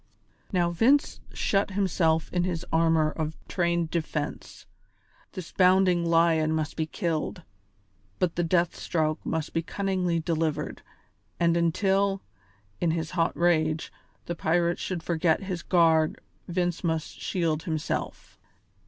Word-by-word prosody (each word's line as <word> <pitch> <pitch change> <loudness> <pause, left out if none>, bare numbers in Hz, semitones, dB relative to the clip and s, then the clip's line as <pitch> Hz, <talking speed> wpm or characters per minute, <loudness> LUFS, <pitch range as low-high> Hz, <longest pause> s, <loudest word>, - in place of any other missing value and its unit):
Now 175 -2 +2
Vince 255 - +3
shut 195 0 0
himself 170 -5 +1
in 180 -1 +1
his 175 -1 -2
armour 160 -1 +3
of 155 0 -4
trained 170 -2 0
defence; 155 -3 -4 0.7
this 185 -4 -7
bounding 185 -1 +4
lion 165 -2 +3
must 155 -1 -2
be 160 -1 -1
killed, 170 0 -3 0.7
but 175 -2 0
the 175 - 0
death 170 0 +1
stroke 155 -2 -1
must 160 -1 -3
be 165 - +1
cunningly 185 -1 -1
delivered, 160 -2 -2 0.6
and 170 -1 +3
until, 195 +3 +1 0.6
in 170 - +1
his 160 -1 -2
hot 170 -2 0
rage, 160 -2 +1 0.3
the 175 - -3
pirate 170 +1 +1
should 180 -3 -4
forget 165 +1 +1
his 185 -3 -4
guard 160 -3 +3 0.3
Vince 175 0 -1
must 160 -2 -2
shield 165 -4 0
himself. 160 -3 -4
170 Hz, 125 wpm, -27 LUFS, 160-180 Hz, 0.7 s, bounding